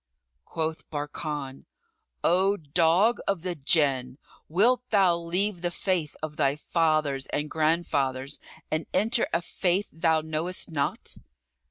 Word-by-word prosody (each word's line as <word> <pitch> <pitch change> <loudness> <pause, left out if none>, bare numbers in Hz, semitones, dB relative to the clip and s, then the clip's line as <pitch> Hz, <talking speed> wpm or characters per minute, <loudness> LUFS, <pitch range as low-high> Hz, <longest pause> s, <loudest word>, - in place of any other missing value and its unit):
Quoth 160 0 -3
Barkan, 145 -2 -5 0.6
"O 190 +4 +3
dog 170 +8 +3
of 195 -4 0
the 180 -1 -2
Jann, 135 -4 +1 0.3
wilt 230 +9 +3
thou 190 -5 +4
leave 175 +3 +1
the 175 - 0
faith 175 -3 -1
of 155 -1 -5
thy 140 -3 +2
fathers 155 -4 0
and 150 +1 -3
grandfathers 145 -4 0 0.3
and 155 +1 -1
enter 225 +3 +3
a 170 - 0
faith 185 +4 0
thou 160 -1 +2
knowest 160 +3 -3
not?" 140 -3 -2
160 Hz, 125 wpm, -27 LUFS, 150-180 Hz, 0.6 s, thou